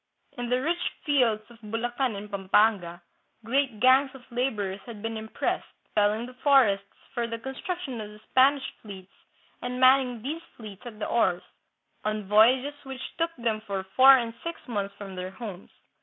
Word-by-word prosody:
In 245 -1 -4
the 250 +1 +2
rich 335 +6 -1 0.2
fields 245 -7 +2
of 230 - -16
Bulacan 235 +2 -2
and 205 +1 -8
Pampanga, 195 -3 +2 0.4
great 255 -2 0
gangs 260 +3 +5
of 260 - -12
laborers 215 -6 -1
had 220 -3 -9
been 225 0 -3
im 220 0 -6
pressed, - - -2 0.3
felling 210 +2 +2
the 250 - -10
forests 250 -8 +4 0.3
for 235 -2 -1
the 230 0 -4
construction 265 +1 -5
of 210 - -7
the 210 0 -13
Spanish 270 +1 +4 0.2
fleets 195 -3 -11 0.5
and 250 0 -4
manning 255 -3 +4
these 310 +5 -3 0.2
fleets 210 -4 -10
at 220 -3 -9
the 215 - -3
oars, 185 -6 +1 0.6
on 215 0 -1
voyages 250 +7 +5
which 265 -2 -8
took 330 0 0
them 230 -3 -1
for 200 -3 -4
four 265 +1 +9
and 230 -2 -3
six 335 -3 -6
months 200 -4 -3
from 195 -2 -8
their 185 0 -4
homes. 195 -1 -8
230 Hz, 170 wpm, -27 LUFS, 210-260 Hz, 0.6 s, four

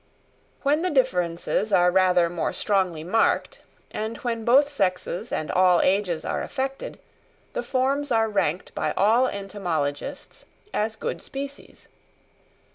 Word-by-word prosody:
When 290 +3 +2
the 365 - 0
differences 185 - 0
are 180 -2 +5
rather 180 -2 +4
more 170 -1 -2
strongly 185 -6 0
marked, 220 +7 +1 0.3
and 220 +2 -4
when 230 -2 -3
both 265 +5 +5
sexes 185 -3 -1
and 155 - -2
all 180 -1 +4
ages 185 -4 +1
are - - -2
affected, 270 0 -4 0.6
the - - -1
forms 275 - 0
are 225 -1 +3
ranked 190 -5 -1
by - - -1
all 225 +6 +4
entomologists 175 - -4 0.3
as 220 +1 -1
good - - -4
species. 275 +1 -8
205 Hz, 125 wpm, -25 LUFS, 180-255 Hz, 0.6 s, are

